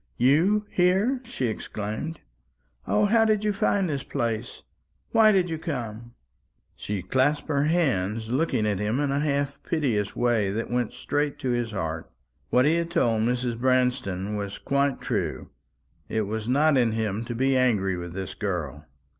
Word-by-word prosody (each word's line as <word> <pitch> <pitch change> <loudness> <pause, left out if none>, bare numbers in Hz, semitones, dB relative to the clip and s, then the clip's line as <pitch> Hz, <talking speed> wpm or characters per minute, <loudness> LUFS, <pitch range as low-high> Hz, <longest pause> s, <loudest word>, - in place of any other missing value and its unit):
"You 175 - +3
here!" 195 +9 +2
she 225 - -3
exclaimed. 110 +7 -4 0.7
"O, 210 - +3
how 225 +2 +4
did 215 -1 +2
you 210 -1 +1
find 195 -1 +1
this 140 -4 -2
place? 115 -1 -3 0.5
Why 220 -1 +6
did 190 -3 +3
you 160 -2 -4
come?" 120 -7 -5 0.6
She 100 -3 -4
clasped 135 +9 +1
her 145 -1 +2
hands, 115 - 0
looking 130 -5 +1
at 105 -3 0
him 105 +5 0
in 145 -1 0
a 140 - +1
half 140 -1 -1
piteous 120 - -1
way 115 -5 +2
that 110 +4 -3
went 120 -2 0
straight 145 0 -1
to 130 -4 0
his 120 -1 0
heart. 80 -6 -4 0.4
What 125 +1 +4
he 160 +3 +3
had 170 0 -1
told 120 -10 +2
Mrs. 120 0 -1
Branston 125 -6 +1
was 100 -1 -4
quite 140 -1 0
true. - - -3 0.6
It 110 - 0
was 110 +1 -3
not 145 +3 +3
in 120 -3 +3
him 110 -1 -1
to 120 - -5
be 135 +2 +2
angry 105 -7 +2
with 85 -1 -6
this 95 -1 -5
girl. 80 -7 -4
125 Hz, 165 wpm, -26 LUFS, 105-150 Hz, 0.7 s, Why